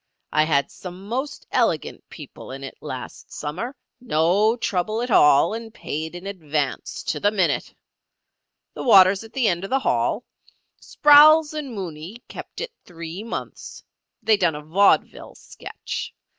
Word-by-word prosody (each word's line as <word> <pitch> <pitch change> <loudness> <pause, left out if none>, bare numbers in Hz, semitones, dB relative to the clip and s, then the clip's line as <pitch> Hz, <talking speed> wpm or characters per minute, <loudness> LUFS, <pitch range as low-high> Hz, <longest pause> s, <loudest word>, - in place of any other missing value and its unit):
I 155 0 +3
had 140 -3 +1
some 185 +2 -10
most 260 +6 -4
elegant - - -1
people - - -11
in 135 +1 -8
it 135 - -8
last 130 -4 -8
summer—no 205 - -1
trouble 215 0 -1
at 245 - -4
all, 150 +1 +5
and 225 0 -6
paid 160 -3 -5
in 175 +2 -9
advance 155 -7 -3
to - - -2
the 205 - +3
minute. 195 -4 0 1.0
The - - -7
water's 195 -4 +6
at 225 - -14
the 260 -4 +1
end 175 -1 0
of 195 - -5
the 265 - +2
hall. - - 0 0.6
Sprowls 300 +1 +6
and 285 -6 -5
Mooney 180 +3 -7
kept - - -9
it 485 0 -5
three 170 +2 -8
months. 230 - -7 0.4
They 215 0 +4
done 175 -5 +1
a 150 - -7
vaudeville 190 +7 +1
sketch. - - -8
195 Hz, 145 wpm, -23 LUFS, 160-230 Hz, 1.0 s, water's